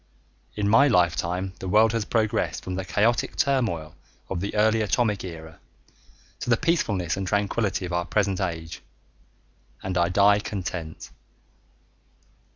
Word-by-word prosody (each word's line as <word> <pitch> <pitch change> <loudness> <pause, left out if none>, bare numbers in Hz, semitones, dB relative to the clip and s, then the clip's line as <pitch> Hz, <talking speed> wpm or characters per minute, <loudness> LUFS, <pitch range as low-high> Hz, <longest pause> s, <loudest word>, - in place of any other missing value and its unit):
In 105 -1 -1
my 115 +7 +6
lifetime 90 -2 +1
the 95 - -6
world 110 +3 +4
has 115 -2 -1
progressed 110 -7 -1
from 95 - -5
the 95 +1 -3
chaotic 110 +6 +1
turmoil 105 - 0 0.4
of 95 - -2
the 100 +4 -4
early 110 +1 +3
Atomic 105 -1 0
era 80 -3 -9 0.8
to - - -5
the 120 - +4
peacefulness 105 - 0
and 95 -1 -4
tranquility 100 -1 0
of 90 - -6
our 85 0 0
present 100 -2 0
age, 80 -3 -4 1.0
and 95 -1 -3
I 85 0 +2
die 100 +2 +4
content. 90 -6 -6
100 Hz, 140 wpm, -25 LUFS, 90-110 Hz, 1.0 s, my